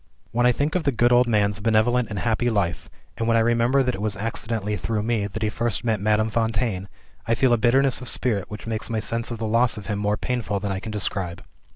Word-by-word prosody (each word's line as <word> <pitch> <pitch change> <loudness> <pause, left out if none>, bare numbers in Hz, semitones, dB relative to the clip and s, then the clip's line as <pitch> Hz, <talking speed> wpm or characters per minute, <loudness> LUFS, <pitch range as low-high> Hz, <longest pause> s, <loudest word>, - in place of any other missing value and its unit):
"When 120 +1 +3
I - - +6
think 145 +5 -1
of 180 - +1
the 145 - +1
good 120 0 +2
old 125 0 +5
man's 105 -3 +1
benevolent 115 +3 +2
and 105 - -5
happy 115 +4 0
life, 100 -6 -1 0.3
and 115 - -1
when 115 0 +4
I - - +4
remember 120 +4 +3
that 125 -1 0
it 100 - -5
was 105 -1 -1
accidentally 110 -1 -2
through 105 0 -2
me 110 -3 0
that 110 +2 -5
he 110 - +2
first 120 +1 -2
met 110 -3 0
Madame 110 +1 +2
Fontaine, 110 -4 -1 0.4
I 115 - +2
feel 125 +1 +3
a - - +4
bitterness 130 +4 +3
of 125 - -3
spirit 105 -7 0
which 105 -1 -8
makes 110 -1 -3
my 115 -1 -1
sense 115 +1 -2
of 120 - -4
the 110 - -3
loss 115 +1 +2
of 105 - -8
him 105 -1 -2
more 105 0 0
painful 115 -4 -2
than 100 0 -3
I 95 - -2
can 110 +2 -7
describe. 95 -4 -3
110 Hz, 250 wpm, -24 LUFS, 105-120 Hz, 0.4 s, I